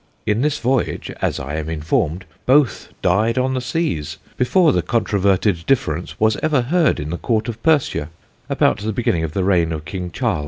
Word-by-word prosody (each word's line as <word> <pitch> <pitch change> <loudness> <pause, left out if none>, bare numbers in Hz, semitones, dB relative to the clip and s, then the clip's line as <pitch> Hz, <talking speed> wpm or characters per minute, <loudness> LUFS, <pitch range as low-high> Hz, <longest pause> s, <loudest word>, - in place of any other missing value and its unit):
In 105 +2 +1
this 150 +1 +1
Voyage 130 -2 -1
(as - - 0
I 70 +3 -4
am 80 0 -4
informed) 80 +2 -1 0.2
both 135 -1 +3
died 105 +6 +2
on 130 +1 +1
the 130 - -1
Seas, 125 - -2 0.2
before 155 +4 +3
the - - +2
controverted 100 -5 +1
difference 90 - -1
was 110 0 +3
ever 155 -4 +2
heard 165 +5 +2
in 75 +1 -4
the 85 - -2
Court 110 -2 0
of 115 -1 -5
Persia, 145 - +1 0.4
about - - +2
the 110 +2 -3
beginning 95 -7 0
of 80 -1 -4
the 95 - 0
Reign 90 -4 +2
of 80 -1 -5
King 90 +1 -5
Charles. 85 - -1
105 Hz, 190 wpm, -20 LUFS, 85-130 Hz, 0.4 s, both